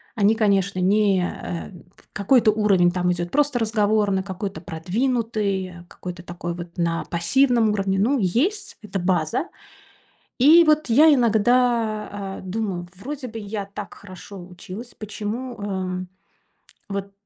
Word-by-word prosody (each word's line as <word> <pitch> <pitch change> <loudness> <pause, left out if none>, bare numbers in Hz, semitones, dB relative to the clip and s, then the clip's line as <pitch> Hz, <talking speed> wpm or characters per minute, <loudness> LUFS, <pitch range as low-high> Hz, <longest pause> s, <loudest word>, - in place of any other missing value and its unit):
Они 210 +1 +3
конечно, 200 -3 +1
не, 195 0 +3
эм, 175 +1 -6
в - - -23
какой-то 220 +2 +4
уровень 195 -5 +3
там 180 0 0
идёт 175 0 -4
просто 290 -3 +2
разговорный, 210 -3 +1
какой-то 195 +1 -5
продвинутый, 200 +3 -1
э, 175 -1 -12
какой-то 180 -1 -8
такой 175 -1 -5
вот 175 0 -9
на 170 -1 -1
пассивном 235 +6 +2
уровне. 195 -2 0
Ну, 255 +7 +2
есть 305 - 0
эта 200 -2 -4
база. 175 - 0 0.9
И 315 +7 +8
вот 305 -2 +3
я 300 +7 +7
иногда, 235 -2 +2
а, 195 -1 -6
думаю: 185 -3 -3
вроде 265 +6 -6
бы 225 - -7
я 205 -1 -5
так 200 0 -8
хорошо 185 -1 -11
училась. 185 +6 -9
Почему, 220 +4 -5
эм, 185 -2 -3 0.8
вот 200 0 -4
205 Hz, 135 wpm, -23 LUFS, 185-230 Hz, 0.9 s, И